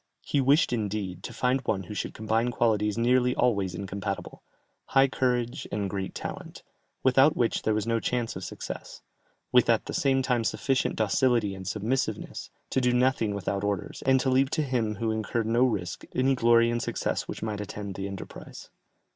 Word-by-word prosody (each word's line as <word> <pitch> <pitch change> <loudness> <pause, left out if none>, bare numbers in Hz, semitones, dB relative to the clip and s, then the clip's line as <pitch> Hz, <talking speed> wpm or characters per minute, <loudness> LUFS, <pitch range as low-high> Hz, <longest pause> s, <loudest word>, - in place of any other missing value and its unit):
He 140 - +1
wished 140 +1 +4
indeed, 100 -5 -3
to - - -7
find 130 +1 +1
one 100 -5 -1
who 100 - -8
should - - -4
combine 110 +2 0
qualities 105 -3 +1
nearly 125 +1 +3
always 100 -7 +1
incompatible, 100 +1 -5 0.4
high 135 0 +4
courage 125 -2 -1
and 100 -2 -2
great 95 -1 -4
talent, - - -7 0.4
without 135 +4 +5
which 120 -2 +1
there 110 - +1
was 110 - -1
no 115 0 +1
chance 120 0 -2
of - - -6
success, - - -7 0.5
with 125 -1 +5
at 115 -2 +3
the - - -5
same 135 -6 +2
time 125 -3 +1
sufficient 130 +3 0
docility 110 -1 +2
and 95 -1 -8
submissiveness, 110 +7 -2 0.2
to 130 - +2
do 125 -1 +3
nothing 125 -4 +2
without 100 0 -2
orders, 100 -3 -3
and 130 0 +5
to 130 - +1
leave 130 +1 +3
to 155 - 0
him 120 -6 -1
who 110 +2 -1
incurred 110 +1 -1
no 115 +3 +3
risk, 100 -8 -2
any 130 +1 +3
glory 115 -1 +4
and 120 0 -1
success - - -2
which - - -6
might 105 -2 -3
attend 100 -1 -6
the 95 +1 -4
enterprise. 100 -1 -9
115 Hz, 180 wpm, -27 LUFS, 105-125 Hz, 0.5 s, without